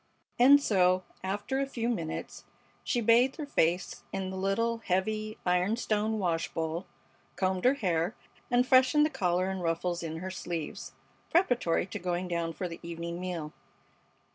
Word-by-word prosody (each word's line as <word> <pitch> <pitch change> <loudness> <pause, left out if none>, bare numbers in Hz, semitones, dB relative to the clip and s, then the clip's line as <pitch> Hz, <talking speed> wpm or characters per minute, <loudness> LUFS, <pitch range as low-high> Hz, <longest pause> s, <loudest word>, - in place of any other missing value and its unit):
And 275 +4 +8
so, 185 -7 +3 0.2
after 205 +8 -2
a 275 - 0
few 235 -4 -3
minutes, 170 -10 -4 0.4
she 240 - 0
bathed 235 +4 +4
her 300 - -5
face 180 - 0
in 190 -1 -3
the - - -5
little, 230 +5 0
heavy, 215 +2 -1
iron 180 +4 +2
stone 220 -1 0
wash 170 -5 -1
bowl, 165 +3 -2 0.5
combed 185 +1 0
her 260 +2 +5
hair, 180 -3 0 0.3
and 245 0 +3
freshened 260 +4 +5
the 305 - -1
collar 185 - 0
and 190 -1 -4
ruffles 170 +1 -1
in 160 -1 -4
her 185 +3 -5
sleeves 170 -3 -5 0.4
preparatory 245 - +2
to 180 - -6
going 180 0 -2
down 170 -1 -1
for 180 +3 -4
the 165 - -8
evening 170 0 -5
meal. 170 -4 -4
190 Hz, 160 wpm, -30 LUFS, 175-230 Hz, 0.5 s, And